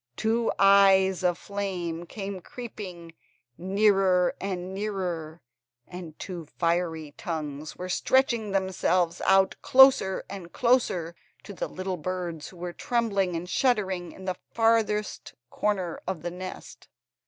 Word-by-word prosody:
Two 225 - +1
eyes 195 -1 +5
of 175 -1 +2
flame 180 -4 -4
came 195 -2 -6
creeping 185 -8 -8 0.4
nearer, 190 0 +3
nearer, 185 -4 -4 0.4
and 175 -4 -9
two 175 -4 -6
fiery 165 -3 0
tongues 150 -2 -5
were 180 - -6
stretching 235 +2 +2
themselves 185 -3 0
out 195 0 +4
closer, 265 -8 +5 0.3
closer, 230 -9 +1 0.3
to 205 - -9
the - - -3
little 185 0 -4
birds 175 -2 -4
who 185 - -15
were 175 0 -5
trembling 200 -7 0
and 170 +2 -4
shuddering 190 -6 0
in 190 - -11
the 185 -1 -2
farthest 225 -2 +1 0.2
corner 190 -5 -1
of 185 -4 -3
the 175 - -3
nest. 185 +1 -9
185 Hz, 120 wpm, -27 LUFS, 175-200 Hz, 0.4 s, eyes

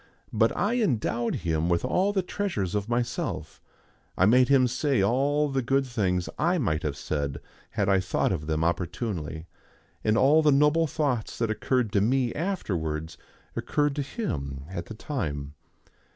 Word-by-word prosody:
But - - +2
I 225 +4 +1
endowed 120 - 0
him 80 0 +1
with 85 -1 +1
all 190 +3 +2
the 195 -2 0
treasures 175 - -2
of 105 +1 -2
myself; 120 0 -2 0.6
I 95 - +5
made 125 +5 +5
him 135 -2 +5
say 130 -2 +1
all 140 +7 +2
the 135 -1 0
good 135 +3 +1
things 95 -8 0
I 175 +4 +2
might 80 - 0
have 75 -2 -3
said 70 -2 -3 0.3
had 100 - -1
I 95 -1 +4
thought 90 +1 0
of 75 -5 -3
them 80 0 0
opportunely, 85 - -2 0.6
and 110 +1 +2
all 145 +6 +5
the 150 -1 +4
noble 150 +4 +4
thoughts 135 -6 -1
that 115 -2 0
occurred 120 0 0
to 100 - +2
me 125 +2 +1
afterwards 85 - -3 0.4
occurred 145 -1 0
to - - +1
him 70 - -4
at 85 -2 -5
the 110 - -8
time. 75 - -4
115 Hz, 165 wpm, -27 LUFS, 85-140 Hz, 0.6 s, I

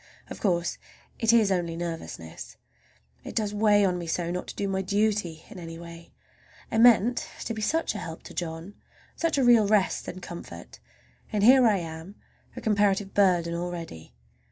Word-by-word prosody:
Of - - -7
course 175 -4 0 0.4
it 225 -1 +3
is 220 -4 +4
only 175 -3 -1
nervousness. 125 - -7 0.7
It - - -8
does 210 -2 0
weigh 205 -1 +4
on 180 -2 0
me 170 - -6
so 170 +1 -1
not 180 +1 -4
to - - -8
do 200 - -2
my 190 0 -1
duty 200 -4 -1
in 185 - -10
any 165 -1 -8
way! 170 0 -11 0.6
I 225 - +1
meant 235 0 +5
to 230 - -3
be 220 - -5
such 320 +6 0
a 210 - -5
help 165 -3 -8
to - - -11
John, 165 +3 -5 0.4
such 330 -3 0
a 270 - +3
real 235 -4 +6
rest 205 -2 +1
and 185 - -6
comfort, 175 -1 -10 0.5
and 210 -2 0
here 255 +2 +7
I 210 -3 +3
am 165 +2 -7 0.4
a - - -7
comparative 205 -2 +1
burden 175 -4 +3
already! 170 - -6
190 Hz, 180 wpm, -27 LUFS, 170-215 Hz, 0.7 s, here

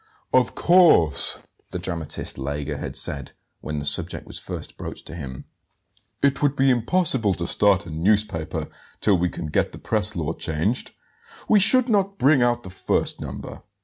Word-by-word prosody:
"Of 130 -1 +2
course," 170 - +4 0.3
the - - -4
dramatist 85 -3 -3
Lega 70 +2 -4
had - - -6
said, 70 -2 +1 0.3
when 75 0 -5
the 70 - -4
subject - - +1
was - - -8
first - - -7
broached - - -8
to - - -10
him; 65 -6 -8 0.8
"it 140 -1 +2
would 145 -1 +1
be 135 -1 +3
impossible 125 - +2
to 85 +1 -3
start 100 +1 +2
a 85 - -9
newspaper 90 0 0 0.3
till 100 -4 +2
we 90 +1 0
can 85 - -7
get 75 - -1
the - - -8
press 105 -1 0
law 80 -2 -2
changed; 85 +12 -2 0.6
we 215 - +5
should 250 +5 +5
not 200 -3 0
bring 140 -4 +4
out 120 0 +1
the 95 - -9
first 95 - -1
number. - - -8
100 Hz, 170 wpm, -23 LUFS, 80-135 Hz, 0.8 s, we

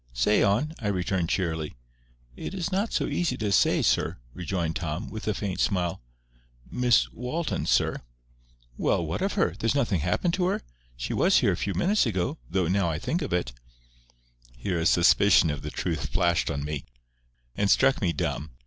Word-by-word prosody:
"Say 85 +13 +2
on," 115 +11 +2
I 105 - -3
returned, 95 -3 -1
cheerily. 80 -5 -2 0.6
"It 195 - -6
is 190 +1 -3
not 200 +4 0
so - - 0
easy 165 -8 -1
to 105 -4 -2
say, 90 - +3
sir," - - +1 0.2
rejoined 85 -2 -2
Tom, 85 +4 -4
with 110 0 -7
a 105 - +2
faint 95 -3 -3
smile. 90 -2 0 0.7
"Miss 125 -3 +3
Walton, 150 +8 -3
sir—" - - +2 0.8
"Well, - - +1
what - - -3
of - - 0
her? 85 - +1
There's 115 +3 +1
nothing 115 -10 +1
happened 90 - 0
to 185 0 +1
her? 190 - -1 0.3
She - - -3
was - - +4
here - - +3
a - - 0
few 100 - -3
minutes 200 - +2
ago—though, 90 - -2
now 95 0 +1
I 80 - -2
think 165 - -2
of 145 - -4
it—" 85 -9 -1 1.0
Here 85 +8 -2
a 80 - +2
suspicion 90 -1 +5
of 75 - -5
the - - -5
truth - - -3
flashed 85 -2 +1
on 70 0 -3
me, 75 -3 -4 0.7
and 100 -1 +1
struck 135 +5 +4
me 90 -4 +2
dumb. 75 -1 -3
95 Hz, 180 wpm, -26 LUFS, 85-120 Hz, 1.0 s, suspicion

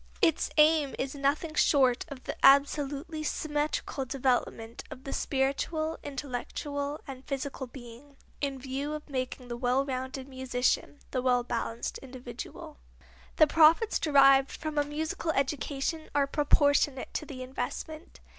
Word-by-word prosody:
Its 325 - +2
aim 305 -2 +5
is 265 0 -2
nothing 290 +3 0
short 265 -5 +3
of 270 -3 -9
the - - -4
absolutely 285 +3 +3
symmetrical 295 -2 -2
development 245 -3 -1
of 260 - -10
the 275 - -5
spiritual, 310 +4 -1
intellectual 285 +2 -4
and 265 -2 -8
physical 275 -1 -4
being, 245 +3 -13 0.2
in 280 -2 -1
view 270 +3 -4
of 305 0 -6
making 255 -2 -4
the 240 - -4
well 250 +2 +1
rounded 260 0 -4
musician, 260 +1 -1
the 255 - 0
well 250 -1 +2
balanced 230 -1 -3
individual. 250 - -9 0.6
The 310 - +7
profits 325 +8 +5
derived 275 -2 +6
from 310 -2 -3
a - - +3
musical 310 +3 -3
education 280 +3 -2
are 285 -1 +4
proportionate 285 -1 +2
to 305 - -3
the 255 -3 -7
investment. 310 +5 -6
275 Hz, 135 wpm, -29 LUFS, 260-295 Hz, 0.6 s, The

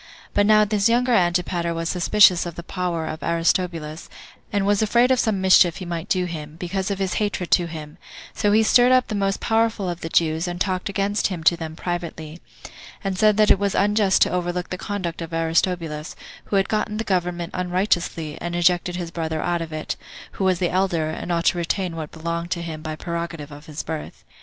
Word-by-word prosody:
But 205 0 +3
now 215 0 +6
this 210 +1 +2
younger 245 +1 +2
Antipater 175 -3 +1
was 165 0 -2
suspicious 180 0 +4
of 170 - -7
the 170 - -7
power 175 -2 -3
of 155 - -5
Aristobulus, 165 -2 -1 0.4
and 200 -1 0
was 205 +1 +2
afraid 235 +4 +3
of 255 - +3
some 215 -5 +1
mischief 185 -3 +5
he 185 - -6
might 170 -1 -5
do 185 -1 +1
him, 155 -3 -7
because 185 +3 -3
of 200 - -2
his 190 -1 -1
hatred 195 -4 -2
to 175 -2 +4
him; 155 -2 -9 0.3
so 205 -1 +1
he 220 +2 +5
stirred 245 +3 +5
up 255 -1 +3
the - - -3
most 195 -1 0
powerful 225 -3 +1
of 175 -1 -4
the 165 - -4
Jews, 160 +1 +1
and 175 0 -4
talked 185 -1 -1
against 200 +1 0
him 180 -5 -5
to 165 +2 +5
them 160 -1 -7
privately; 170 -2 -5 0.6
and 195 -1 -1
said 210 +1 +3
that 215 -1 +5
it - - +4
was 200 -1 0
unjust 205 -1 +3
to - - -1
overlook 180 0 -2
the - - -1
conduct 180 -5 -4
of 165 0 -7
Aristobulus, 165 -1 -1 0.3
who - - -3
had 195 0 +3
gotten 215 0 -1
the 225 - -1
government 175 -3 -1
unrighteously, 180 -4 -1
and 175 0 -3
ejected 175 +1 +2
his 175 -2 -5
brother 160 -2 -3
out 175 +1 -1
of 165 -1 -6
it, 155 0 -4 0.3
who - - -4
was 185 -1 +3
the 175 -1 0
elder, 175 -4 0
and 175 - -5
ought 170 0 0
to 175 - +3
retain 175 +1 -2
what 155 -2 -5
belonged 170 +1 -4
to 175 -2 -2
him 160 -2 -6
by 155 0 -5
prerogative 170 -3 -5
of 145 +3 -12
his 155 0 -5
birth. 160 -2 -6
175 Hz, 215 wpm, -23 LUFS, 165-195 Hz, 0.6 s, now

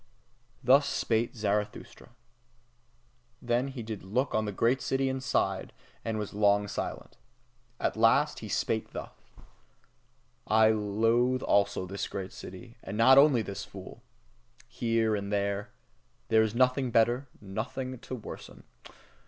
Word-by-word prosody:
Thus 135 +3 +5
spake 115 0 0
Zarathustra. 105 0 -3 1.3
Then 120 +2 0
did 120 -5 -7
he 110 - -3
look 120 +9 -2
on 110 0 +1
the 105 - -2
great 115 +6 +1
city 135 0 0
and 130 0 -3
sighed, 135 - -1 0.3
and 110 -1 -2
was 105 -2 -4
long 105 0 +3
silent. 100 - -5 0.6
At - - 0
last - - +3
he - - -8
spake - - -1
thus: - - -6 1.4
I 110 0 +5
loathe 115 +4 +1
also 100 -2 +2
this 100 +2 -4
great 95 -1 -6
city, 95 +6 -10
and 100 - -5
not 130 +4 +7
only 140 -5 +5
this 100 -2 -6
fool. - - -11 0.7
Here 115 -2 0
and 100 0 -4
there 100 0 -1 0.6
there 110 -1 +5
is 110 0 0
nothing 130 +1 +3
to - - -5
better, 120 +4 +3
nothing 115 +6 -5
to 130 - -6
worsen. 115 - -10
110 Hz, 135 wpm, -29 LUFS, 105-125 Hz, 1.4 s, not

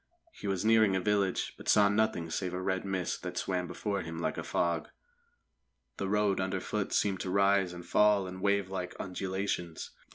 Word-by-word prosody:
He - - -8
was 95 0 -1
nearing 110 -3 +5
a - - +2
village, 100 -1 0
but - - -6
saw 105 -1 +6
nothing 105 -5 0
save 90 +1 -2
a - - -2
red 95 0 -1
mist 95 -2 -2
that - - -5
swam 90 -1 -1
before 100 +1 -2
him 80 0 -6
like 85 - -2
a - - -4
fog. 85 -2 -1 1.1
The 95 - -2
road 105 -1 +2
underfoot 95 +2 -2
seemed 95 -3 +1
to 95 - -3
rise 100 -1 +3
and 85 -1 -9
fall 105 -2 +4
in 95 0 -7
wavelike 95 -2 0
undulations. 95 -2 -3
95 Hz, 175 wpm, -31 LUFS, 90-100 Hz, 1.1 s, saw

